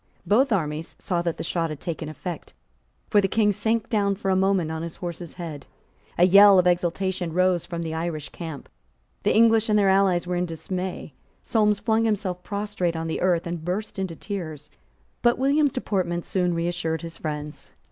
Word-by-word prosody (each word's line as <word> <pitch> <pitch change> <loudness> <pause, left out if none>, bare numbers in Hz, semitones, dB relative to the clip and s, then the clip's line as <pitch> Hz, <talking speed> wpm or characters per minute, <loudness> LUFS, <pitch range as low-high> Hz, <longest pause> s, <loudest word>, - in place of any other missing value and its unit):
Both 250 +6 +3
armies 160 -5 -2
saw 175 -3 -1
that 170 -1 -2
the - - -4
shot 165 -1 -1
had 155 -2 -6
taken 165 -3 -4
effect; 175 +3 -7 0.5
for 205 - +4
the 195 - +1
King 210 +1 +2
sank 225 +3 0
down 200 -3 +1
for 195 -1 -1
a - - +3
moment 190 -4 +2
on 160 0 -4
his 170 0 -6
horse's 175 -1 -7
neck. 155 -6 -7 0.5
A 175 - +6
yell 200 +1 +8
of 180 - +4
exultation 180 0 0
rose 185 -1 +2
from 170 -1 -4
the 160 -1 -4
Irish 160 -2 -3
camp. 160 -5 -8 0.5
The - - +1
English 225 0 +5
and 210 - +4
their 200 -2 +4
allies 190 -2 +3
were 180 0 -2
in 180 0 0
dismay. 180 0 -5 0.3
Solmes 210 -2 +2
flung 220 +1 +1
himself 200 -5 -1
prostrate 200 -4 -2
on 160 0 -3
the 160 - -3
earth, 175 -2 +2
and 170 -2 -4
burst 195 +4 -3
into 185 -3 -3
tears. 155 -7 -6 0.5
But 240 0 +3
William's 280 +2 +3
deportment 180 -8 -2
soon 180 -2 0
reassured 165 -1 -2
his 165 0 -8
friends. 150 -1 -5
180 Hz, 190 wpm, -25 LUFS, 165-200 Hz, 0.5 s, yell